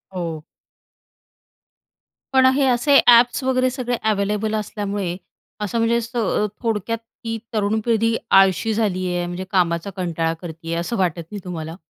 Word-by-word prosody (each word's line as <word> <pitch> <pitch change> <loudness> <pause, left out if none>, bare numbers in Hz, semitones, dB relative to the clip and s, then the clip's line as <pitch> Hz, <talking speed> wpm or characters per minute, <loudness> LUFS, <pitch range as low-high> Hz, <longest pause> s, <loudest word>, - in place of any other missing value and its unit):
हो. 165 -4 -4 1.9
पण 260 -1 +5
हे 280 0 +2
असे 260 +3 +4
ॲप्स 240 +2 +6
वगैरे 255 0 +2
सगळे 250 -1 -2
अवेलेबल 210 +1 0
असल्यामुळे, 205 -3 -3 0.5
असं 210 +3 -2
म्हणजे 230 +1 +2
स 230 +1 -8 0.5
थोडक्यात 230 0 -1 0.3
ती 225 0 -3 0.2
तरुण 215 0 +1
पिढी 230 -1 +2 0.2
आळशी 195 +3 +4
झाली 190 -4 0
आहे. 175 0 -1
म्हणजे 175 +1 -5
कामाचा 170 -1 +1
कंटाळा 165 -2 -1
करती 165 -2 -9
आहे. 170 - -1
असं 230 +7 -3
वाटत 175 -3 0
नाही 205 - -5
तुम्हाला? 165 -3 -6
210 Hz, 140 wpm, -21 LUFS, 175-230 Hz, 1.9 s, ॲप्स